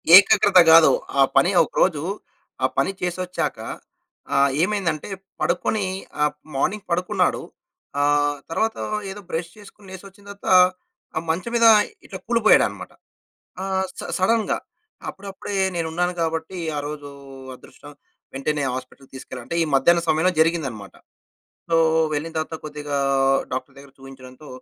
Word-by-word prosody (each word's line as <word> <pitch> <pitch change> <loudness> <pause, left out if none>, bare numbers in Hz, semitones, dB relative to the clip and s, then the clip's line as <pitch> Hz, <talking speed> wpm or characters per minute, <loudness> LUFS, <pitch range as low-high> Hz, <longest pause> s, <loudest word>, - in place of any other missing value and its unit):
ఏకాగ్రత 200 0 +7
కాదు. 160 -2 +8 0.3
ఆ - - +7
పని 180 - +4
ఒకరోజు 160 -6 0 0.6
ఆ - - +5
పని - - +2
చేసొచ్చాక 180 +1 -3 0.7
ఆహ్, 140 0 +3
ఏమైందంటే 180 -6 -1 0.3
పడుకొని 190 +4 0 0.4
ఆహ్, 150 - +1 0.2
మార్నింగ్ 200 +9 -1
పడుకున్నాడు. 180 +1 0 0.6
ఆహ్, 145 0 +2
తర్వాత 220 +6 -1 0.4
ఏదో 205 +2 -9
బ్రష్ 170 0 -3
చేసుకొని 205 -1 -15
లేసి 190 +1 -10
వచ్చిన 195 +1 -19
తర్వాత 200 - -11 0.7
ఆ - - +2
మంచం 180 +8 -2
మీద 230 -1 +4 0.4
ఇట్లా 190 - -8
కూలిపోయాడన్నమాట. 230 -2 +2 0.7
ఆహ్, 190 0 -1
స - - -4 0.2
సడన్‌గా. 215 +3 +1 0.5
అప్పుడప్పుడే 195 +1 -7 0.2
నేను 165 -1 -1
ఉన్నాను 180 +2 -1
కాబట్టి 165 +2 -3 0.2
ఆరోజు 145 0 -6 0.5
అదృష్టం 145 +3 -15 0.4
వెంటనే 145 +2 -1
హాస్పిటల్‌కి 130 +1 -9
తీసుకెళ్ళాను. 130 -2 -9
అంటే 170 - -3
ఈ - - -1
మధ్యాహ్నం 170 +5 +3
సమయంలో 160 +4 +2
జరిగిందన్నమాట. 135 - -2 0.8
సో, 165 - +3 0.4
వెళ్ళిన 155 +3 -3
తర్వాత 160 +1 -3
కొద్దిగా 150 -1 -5 0.6
డాక్టర్ 130 +2 -5
దగ్గర 140 -1 -15
చూయించడంతో, 135 +2 -13
165 Hz, 125 wpm, -22 LUFS, 145-190 Hz, 0.8 s, కాదు